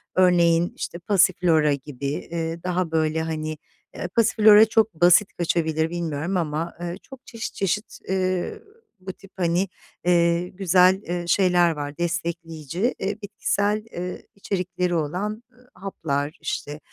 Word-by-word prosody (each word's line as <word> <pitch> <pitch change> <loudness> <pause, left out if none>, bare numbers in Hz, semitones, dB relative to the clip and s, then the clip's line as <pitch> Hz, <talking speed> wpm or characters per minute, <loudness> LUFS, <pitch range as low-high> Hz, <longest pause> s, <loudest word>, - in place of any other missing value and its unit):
örneğin, 175 -2 +4
işte, 170 - -5
passiflora 170 -5 +3
gibi, 140 -1 -7
eee, 165 +3 -3
daha 180 -2 -1
böyle, 160 0 +1
hani, 155 -1 -3 0.4
eee, - - -4
passiflora 215 -1 +6
çok 220 -2 +2
basit 180 +3 +5
kaçabilir 160 -2 0
bilmiyorum 170 +1 -2
ama, 160 0 -2
ııı, 175 0 -4
çok 270 +5 -15
çeşit 230 -1 -6
çeşit, 200 +3 -2
eee, 185 -1 -1 0.4
bu 190 0 -7
tip, 195 +1 -18
hani, 175 +2 +1 0.4
eee, 170 0 +3
güzel, 185 0 +3
eee, 175 -2 -4
şeyler 180 -2 +4
var 145 -2 -5
destekleyici, 170 - -2
eee, 200 +3 -2
bitkisel, 205 +1 -1
ııı, 180 +1 -4 0.2
içerikleri 180 -2 -2
olan, 190 +9 -2
ııı, 250 0 -24
haplar, 155 -6 -3
işte, 145 +1 -4
175 Hz, 130 wpm, -24 LUFS, 160-190 Hz, 0.4 s, passiflora